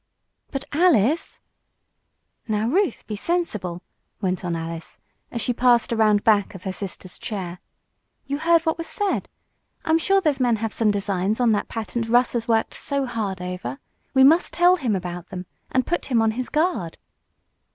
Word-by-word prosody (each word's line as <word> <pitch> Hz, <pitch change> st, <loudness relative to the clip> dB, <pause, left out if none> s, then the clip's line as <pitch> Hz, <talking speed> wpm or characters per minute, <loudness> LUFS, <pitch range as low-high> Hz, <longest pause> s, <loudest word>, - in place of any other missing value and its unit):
"But 275 Hz, 0 st, -4 dB
Alice 310 Hz, -, +2 dB, 0.5 s
" -, -, -49 dB
"Now, 215 Hz, 0 st, 0 dB
Ruth, 355 Hz, -, +1 dB
be 215 Hz, -, -4 dB
sensible," 210 Hz, -, -2 dB, 0.4 s
went 185 Hz, -1 st, -1 dB
on 175 Hz, -2 st, -1 dB
Alice, 165 Hz, 0 st, -6 dB, 0.3 s
as 235 Hz, -, -4 dB
she 245 Hz, -, 0 dB
passed 240 Hz, -1 st, +3 dB
around 215 Hz, -2 st, +3 dB
back 205 Hz, -3 st, +3 dB
of 185 Hz, -, -10 dB
her 190 Hz, -, -2 dB
sister's 185 Hz, -1 st, -7 dB
chair. 185 Hz, -5 st, -5 dB, 0.7 s
"You 280 Hz, +1 st, -3 dB
heard 335 Hz, +1 st, +4 dB
what 320 Hz, +1 st, 0 dB
was 330 Hz, -, -4 dB
said. 405 Hz, +3 st, -1 dB, 0.6 s
I'm 320 Hz, +1 st, +3 dB
sure 390 Hz, +3 st, +3 dB
those 305 Hz, -7 st, +1 dB
men 245 Hz, -3 st, +3 dB
have 225 Hz, 0 st, -3 dB
some 225 Hz, -2 st, +2 dB
designs 200 Hz, +1 st, 0 dB
on 240 Hz, -2 st, +4 dB
that 205 Hz, -, 0 dB
patent 230 Hz, +1 st, -3 dB
Russ 245 Hz, +1 st, +4 dB
has 230 Hz, -1 st, -2 dB
worked 225 Hz, -1 st, +1 dB
so 280 Hz, -1 st, -2 dB
hard 205 Hz, -7 st, -3 dB
over. 180 Hz, -9 st, -5 dB, 0.4 s
We 265 Hz, -, +7 dB
must 320 Hz, +6 st, +5 dB
tell 355 Hz, +1 st, +5 dB
him 240 Hz, -, 0 dB
about 175 Hz, -1 st, -5 dB
them, 185 Hz, -1 st, -7 dB, 0.3 s
and 260 Hz, -1 st, +2 dB
put 345 Hz, -, -1 dB
him 245 Hz, -4 st, +2 dB
on 225 Hz, 0 st, +3 dB
his 245 Hz, +3 st, -4 dB
guard." 305 Hz, -, 0 dB
225 Hz, 175 wpm, -23 LUFS, 195-280 Hz, 0.7 s, We